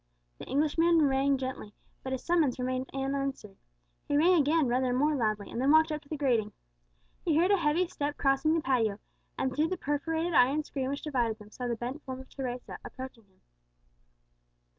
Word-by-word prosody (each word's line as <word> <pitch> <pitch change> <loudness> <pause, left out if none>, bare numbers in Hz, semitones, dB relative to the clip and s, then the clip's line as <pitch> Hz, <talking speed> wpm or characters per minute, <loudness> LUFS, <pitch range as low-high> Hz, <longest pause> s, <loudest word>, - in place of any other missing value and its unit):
The - - -8
Englishman 320 +3 +3
rang 270 +1 +2
gently, 255 -5 -6 0.3
but 260 - -6
his 260 -1 -3
summons 330 -7 +2
remained 255 +1 -2
unanswered. 270 -6 -3 0.5
He 290 - +1
rang 340 +5 +5
again 315 -1 +3
rather 250 +1 +1
more 295 +4 +2
loudly, 215 -5 -1
and 235 - -3
then 270 - +2
walked 315 +1 +5
up 305 -1 -3
to 285 - -23
the 310 - -3
grating. 235 -7 +1 0.7
He 315 -3 +2
heard 355 +4 +4
a 400 - +5
heavy 335 +1 +2
step 290 -3 -3
crossing 275 +3 +2
the 330 - +1
patio, 230 -7 +1 0.4
and 260 -1 -1
through 305 +2 +2
the 370 +2 -3
perforated 320 +3 -1
iron 285 +3 +4
screen 265 -3 -3
which 280 +1 -4
divided 240 -7 0
them 210 -1 -15
saw 250 +1 -5
the 235 - -1
bent 245 +6 -5
form 260 -2 -7
of 265 - -12
Teresa 250 -2 -6
approaching 255 -4 -9
towards - - -34
him. 185 - -34
270 Hz, 195 wpm, -29 LUFS, 250-305 Hz, 0.7 s, rang